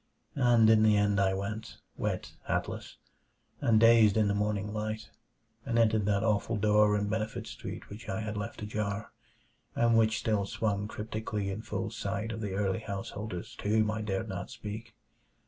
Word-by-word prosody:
And 120 -3 +6
in 110 -1 +6
the 110 -1 +5
end 105 -1 +2
I 95 -1 +3
went, 110 +3 -5 0.2
wet, - - -3
hatless, - - -3 0.6
and 110 -2 +4
dazed 115 -2 +6
in 105 -2 +3
the - - +2
morning 105 0 -1
light, 110 +1 -4 0.5
and 115 - -1
entered 110 -3 +3
that 100 0 +2
awful 110 +1 +1
door 105 0 +4
in 105 0 -1
Benefit 110 +1 -2
Street - - -7
which 110 +3 -9
I 95 +2 -2
had 105 0 -4
left 105 +2 -5
ajar, 105 0 -3 0.6
and 115 -1 +3
which 110 -1 +4
still 105 -3 0
swung 105 -1 -1
cryptically 105 -2 -3
in 100 +3 -4
full 110 - -3
sight 110 +3 -3
of 110 -1 -5
the 100 -3 -3
early 95 +1 0
householders 100 -2 -5
to 105 - -3
whom 110 0 +3
I 110 0 -3
dared 95 -3 -2
not - - -5
speak. 110 +2 -7
105 Hz, 175 wpm, -30 LUFS, 100-110 Hz, 0.6 s, And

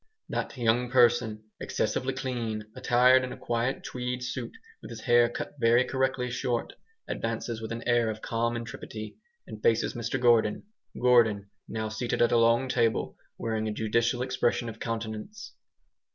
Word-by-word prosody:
That - - -3
young 120 +1 +2
person, 120 -3 +3 0.2
excessively 130 +1 -1
clean, 115 -5 -3
attired 125 +1 +5
in 125 - -4
a - - -7
quiet 120 +3 -1
tweed 125 0 -4
suit, 125 -1 -5 0.2
with - - -10
his 115 -2 -8
hair 120 0 +4
cut - - -5
very 120 +1 +4
correctly 130 -1 -1
short, 125 -1 -2 0.3
advances 115 0 -3
with 110 0 -6
an 115 0 -4
air 120 -2 +3
of 110 0 -4
calm 115 +1 -1
intrepidity, 110 - -7 0.3
and 105 - -9
faces 115 0 +2
Mr 120 +3 -2
Gordon. 115 -3 +3 0.4
Gordon, 110 -5 +3 0.2
now 110 0 -3
seated 110 +3 -2
at 120 - +3
a 120 - +4
long 115 +3 +4
table, 115 -3 +1 0.2
wearing 110 -1 -2
a - - -1
judicial 115 +3 0
expression 125 -2 0
of 110 0 -9
countenance. 115 - -5
120 Hz, 155 wpm, -28 LUFS, 110-125 Hz, 0.4 s, attired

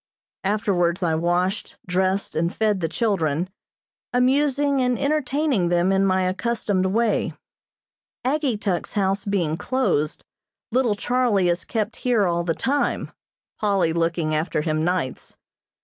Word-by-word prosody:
Afterwards 190 -3 +1
I 165 -2 +2
washed, 175 +4 0
dressed 190 +2 0
and 170 +2 +1
fed 210 -2 +1
the 165 -2 -1
children, 180 -4 0 0.6
amusing 275 +2 +2
and 250 -1 +1
entertaining 280 - +1
them 175 +2 +2
in 195 0 +3
my 185 0 +2
accustomed 190 0 0
way. 220 +3 +1 0.9
Ageetuk's 235 - -1
house 195 0 0
being 175 -6 0
closed, 250 - -1 0.5
little 240 -3 +2
Charlie 225 -5 +1
is 175 +1 0
kept 220 0 -2
here 235 -5 +2
all 170 -1 0
the 165 -2 -1
time, 280 +1 -1 0.5
Polly 195 -6 +2
looking 165 -1 0
after 155 0 0
him 155 0 0
nights. 175 -6 -2
195 Hz, 125 wpm, -23 LUFS, 175-240 Hz, 0.9 s, in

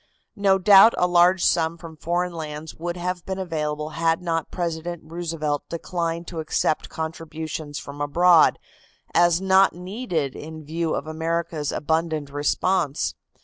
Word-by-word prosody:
No 200 -2 +3
doubt 200 +3 +7
a - - +3
large 180 +1 +4
sum 165 0 +2
from 165 -1 -10
foreign 175 +3 -1
lands 155 -1 -6
would 175 +2 -5
have 180 0 -3
been 190 0 -4
available 155 -4 -3
had 165 +1 +1
not 165 -3 -2
President 170 -1 -4
Roosevelt 160 -3 -3
declined 170 0 -3
to 170 - -6
accept 155 0 0
contributions 160 -2 -5
from 145 +1 -8
abroad, 170 +3 +5 0.6
as 175 0 +4
not 190 0 +4
needed 180 - -3
in 155 0 -9
view 165 +1 -1
of - - -3
America's 160 -1 -2
abundant 160 -1 -1
response. 145 - 0
165 Hz, 140 wpm, -24 LUFS, 155-175 Hz, 0.6 s, doubt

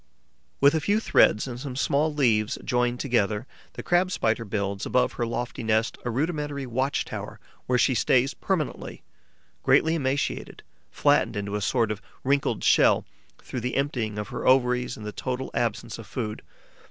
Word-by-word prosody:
With 140 +2 +6
a 160 - +2
few 205 +7 +2
threads 110 - +3
and 120 -1 -6
some 135 -1 -6
small 145 +3 +1
leaves 115 -7 +1
joined 125 0 0
together, 110 -4 0 0.3
the - - -7
Crab 180 +1 +2
Spider 115 -9 0
builds, 100 -1 -3
above 125 0 +2
her 120 - -2
lofty 120 +1 -4
nest, 110 0 +1
a 120 - -2
rudimentary 145 +1 -2
watch 130 +3 -1
tower - - -7 0.3
where 125 - +2
she 130 +2 +3
stays 130 +3 +2
permanently, 175 -7 -3 0.6
greatly 160 - +4
emaciated, 140 -3 -2 0.3
flattened - - +2
into 100 0 -3
a 105 - -2
sort 115 +1 +1
of 105 -2 -5 0.2
wrinkled 140 +1 +1
shell - - +4 0.4
through 125 - -5
the 125 +2 -3
emptying 120 -7 -1
of 105 - -4
her - - -4
ovaries 125 -1 +3
and 105 - -9
the 105 - -4
total 130 +3 -4
absence 115 0 -2
of 110 - -10
food. 110 -2 -4
125 Hz, 165 wpm, -26 LUFS, 110-140 Hz, 0.6 s, With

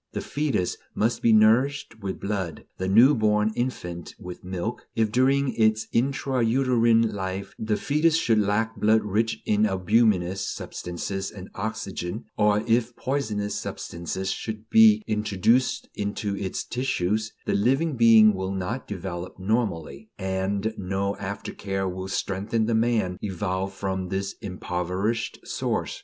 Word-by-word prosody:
The - - -2
foetus 140 -11 -1 0.2
must 115 +2 0
be 115 - +4
nourished 115 +3 +3
with 95 -1 -4
blood; 100 -5 -3
the 95 - -1
new 115 +9 +7
born 105 -3 +2
infant 90 -9 -4
with 90 0 -9
milk. 95 +5 -4
If 110 -2 +1
during 135 +3 +2
its 110 -1 +2
intra 130 0 +1
uterine 115 -2 +3
life 95 0 -4
the 110 -1 0
foetus 150 +2 +2
should 115 -9 +3
lack 105 +2 +1
blood 110 +1 +3
rich 110 +2 -1
in 105 0 +3
albuminous 95 -1 +2
substances 95 +3 -4
and 95 -2 -10
oxygen, 100 -1 -4
or 105 0 +3
if 120 +1 +1
poisonous 110 -7 -2
substances 85 +3 -4
should 110 -1 -6
be 220 -1 +7
introduced 110 +4 +1
into 100 0 -3
its 95 -2 -3
tissues, 110 -4 -1
the - - 0
living 135 +9 +2
being 115 -2 +7
will 95 0 -3
not 105 +7 -3
develop 90 -2 -6
normally, 95 - -2
and 95 +3 -1
no 100 +1 -1
after 100 +1 -5
care 95 -1 -2
will 95 +1 -4
strengthen 100 +4 -1
the 115 - 0
man 110 -5 +1
evolved 95 -1 -2
from 95 -2 -3
this 95 +1 -2
impoverished 95 +3 -2
source. - - -2
105 Hz, 140 wpm, -25 LUFS, 95-115 Hz, 0.2 s, new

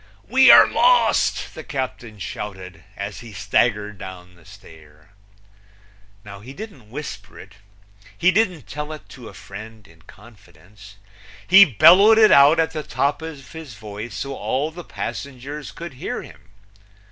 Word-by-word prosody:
"We - - +5
are - - +9
lost!" - - +2
the - - -9
captain 130 -6 -6
shouted, 95 -4 -8
As - - -6
he 115 -2 -12
staggered 105 -2 -1
down 90 -1 -10
the 85 -2 -22
stair. 75 -1 -17 1.1
He 100 +6 -11
didn't 190 - -11
whisper 115 -5 -9
it; 100 +2 -15 0.6
he 180 +2 +3
didn't 185 -7 0
tell 150 +1 -7
it 155 - -12
to 125 -4 -12
a - - -15
friend 110 +2 -12
in 80 0 -21
confidence; 100 -1 -18 0.5
he 195 +2 +8
bellowed 195 - +6
it 220 -1 +6
out 145 +4 +6
at 160 - +1
the 155 - -5
top 145 +1 -2
of 150 -5 -10
his 160 -7 -10
voice 110 +1 -9
so 140 0 -5
all 140 +3 -3
the 175 +2 -10
passengers 140 +1 -7
could 170 -2 -9
hear 125 - -6
him. 95 - -17
120 Hz, 145 wpm, -21 LUFS, 100-155 Hz, 1.1 s, are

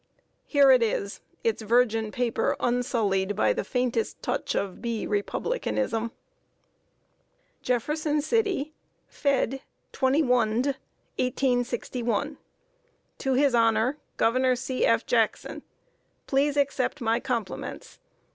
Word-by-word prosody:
Here 280 -2 +6
it 255 -2 +6
is 205 -3 -1 0.2
its 225 -1 0
virgin 225 -1 +2
paper 245 -1 0
unsullied 215 -5 0
by 110 - +2
the - - -2
faintest 245 -2 -1
touch - - -2
of 195 -2 -3
"B. 235 -2 -2
Republicanism." 230 - -1 1.5
"JEFFERSON 295 +5 0
CITY, 365 -6 0 0.3
fed. 270 -2 0 0.3
21nd 255 -2 +2 0.5
1861. 245 +1 -1 0.8
"to 270 - 0
his 275 0 +3
Honour 230 +4 +2 0.2
Gov. 255 +2 +2
C. 260 0 0
F. - - +2
JACKSON. - - 0 0.6
Please 285 +1 +1
Accept 280 0 0
My 230 -1 +1
Compliments. 235 -5 -5
250 Hz, 100 wpm, -26 LUFS, 225-275 Hz, 1.5 s, Here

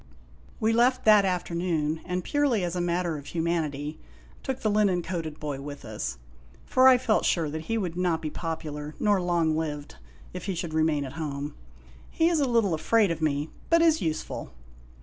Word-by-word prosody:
We 220 +1 +2
left 250 +2 +3
that 210 -2 +7
afternoon, 170 -4 -1
and 180 0 -2
purely 280 - +1
as 175 0 -2
a 180 - 0
matter 175 -2 -1
of 145 - -12
humanity 155 -3 -2 0.4
took 265 -1 -4
the 215 - +1
linen 200 -4 +2
coated 165 -4 -4
boy 145 -3 -4
with 145 -1 -8
us; 65 - -4 0.5
for 255 0 +5
I 260 -1 +8
felt 240 -3 +1
sure 160 -4 +1
that 160 +1 -5
he 225 - +1
would 180 -6 -2
not 175 -2 +1
be 155 -2 -4
popular 150 -3 -5
nor 205 -3 +3
loner 170 -2 +1
lived 150 - -4 0.4
if 180 - -6
he 195 -2 -2
should 170 -2 -4
remain 155 -2 +1
at 130 - -8
home. 145 -1 -4 0.6
He 330 +1 +2
is 335 -2 +2
a 275 -3 +1
little 225 -7 +2
afraid 200 +5 +3
of 165 -1 -3
me, 150 0 0 0.2
but 335 0 +5
is 320 -1 +4
useful. 155 - -3
170 Hz, 190 wpm, -27 LUFS, 155-210 Hz, 0.6 s, I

